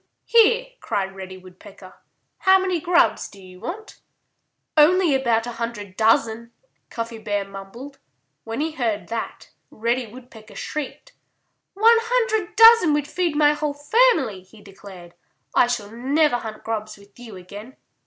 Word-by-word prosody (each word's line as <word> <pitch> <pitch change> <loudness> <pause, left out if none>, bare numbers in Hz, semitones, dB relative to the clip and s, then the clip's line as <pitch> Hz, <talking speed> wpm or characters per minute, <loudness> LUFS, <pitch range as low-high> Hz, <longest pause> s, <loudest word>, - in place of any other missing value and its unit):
"Here!" 465 +2 +4
cried 195 -1 -3
Reddy 190 -1 -9
Woodpecker. 185 +1 -15 0.5
"How 380 -1 +5
many 370 -3 -1
grubs 340 -10 +2
do 200 - -16
you 185 -1 -14
want?" 420 - -8 0.8
"Only 330 +1 +4
about 235 -4 +1
a 240 - -5
hundred 205 -5 -5
dozen!" 225 +1 +1 0.4
Cuffy 230 -1 -6
Bear 205 -2 -2
mumbled. 195 +8 -11 0.4
When 225 +4 -5
he 320 +1 -1
heard 225 - -3
that, 230 0 -6 0.2
Reddy 235 +2 -2
Woodpecker 225 -2 -14
shrieked. 305 - -6 0.6
"One 455 +3 +5
hundred 460 -5 -1
dozen 450 -8 +7
would 295 -1 -2
feed 340 0 -2
my 295 0 +4
whole 295 -1 -3
family," 290 - +2
he 190 +4 -19
declared. 195 -3 -14 0.4
"I - - +4
shall 215 -4 -4
never 270 +4 +1
hunt 220 -2 -8
grubs 215 -1 -5
with 200 +2 -20
you 230 -4 -11
again." 205 +8 -11
235 Hz, 145 wpm, -22 LUFS, 205-315 Hz, 0.8 s, dozen